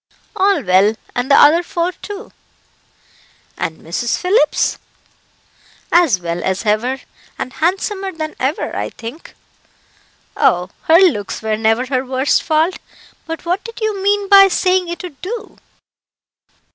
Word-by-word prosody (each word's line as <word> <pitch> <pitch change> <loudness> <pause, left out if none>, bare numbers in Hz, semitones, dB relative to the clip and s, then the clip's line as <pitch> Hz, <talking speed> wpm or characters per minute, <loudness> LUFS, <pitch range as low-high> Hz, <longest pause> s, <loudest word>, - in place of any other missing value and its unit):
"All 385 -5 +2
well, 195 +3 +3 0.2
and 245 +2 -2
the 280 - +6
other 315 +4 +6
four, 345 0 -2
too." 410 +3 -9 1.2
"And 160 - -4
Mrs. 230 +9 -2
Phillips?" 385 +6 +1 1.1
"As 330 - +4
well 170 0 -4
as 190 +4 -2
ever, 235 +6 0 0.4
and 255 - -5
handsomer 385 +3 -1
than 315 -3 -5
ever, 270 +4 -2
I - - -3
think." 240 +8 -10 1.0
"Oh! 180 +1 +2
her 325 - +6
looks 295 - +1
were 220 -1 0
never 225 +3 +1
her 255 -1 -1
worst 260 +1 +1
fault. 320 +3 0 0.5
But 325 +1 -6
what 360 +4 -1
did 460 0 -9
you 430 -3 -2
mean 405 0 +1
by 390 -1 +8
saying 370 0 +1
it 345 +2 -6
would 330 -7 -10
do?" 440 +4 -7
320 Hz, 135 wpm, -17 LUFS, 230-380 Hz, 1.2 s, by